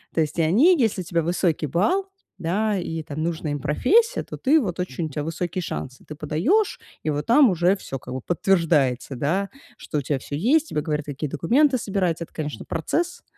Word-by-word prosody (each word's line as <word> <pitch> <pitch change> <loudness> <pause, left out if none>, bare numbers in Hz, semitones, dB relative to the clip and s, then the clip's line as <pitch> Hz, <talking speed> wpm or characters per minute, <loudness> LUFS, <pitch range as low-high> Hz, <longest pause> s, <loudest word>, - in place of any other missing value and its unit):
То - - +1
есть 155 +2 -2
и - - +5
они, 245 - +5
если 210 -4 +1
у - - -5
тебя 170 -1 0
высокий 165 -2 0
балл, 365 - +1 0.3
да, 205 +5 0
и 165 -3 -4
там 155 +1 -6
нужная 160 -3 -2
им 145 - -3
профессия, 445 - +2
то - - -8
ты, 300 +4 +4
вот 185 - -3
очень 170 -2 -3
у - - -4
тя 145 +1 -4
высокие 170 +3 -3
шансы. 130 -5 -6
Ты 155 - -8
подаёшь, 185 - +1 0.2
и 155 - -1
вот 145 +1 -3
там 250 +1 +6
уже 180 +3 +3
всё 135 - -6
как 125 - -8
бы 130 - -4
подтверждается, 160 -8 +1
да, 185 +10 0 0.3
что 150 - -3
у - - -2
тебя 140 +1 -1
всё 145 - -6
есть, 290 - +2
тебе 150 - -1
говорят, 150 -1 -2
какие 145 0 -4
документы 255 - +3
собирать. 190 -6 -1
Это, - - -15
конечно, 150 -2 -5
процесс, 340 - -2
170 Hz, 210 wpm, -23 LUFS, 150-215 Hz, 0.3 s, там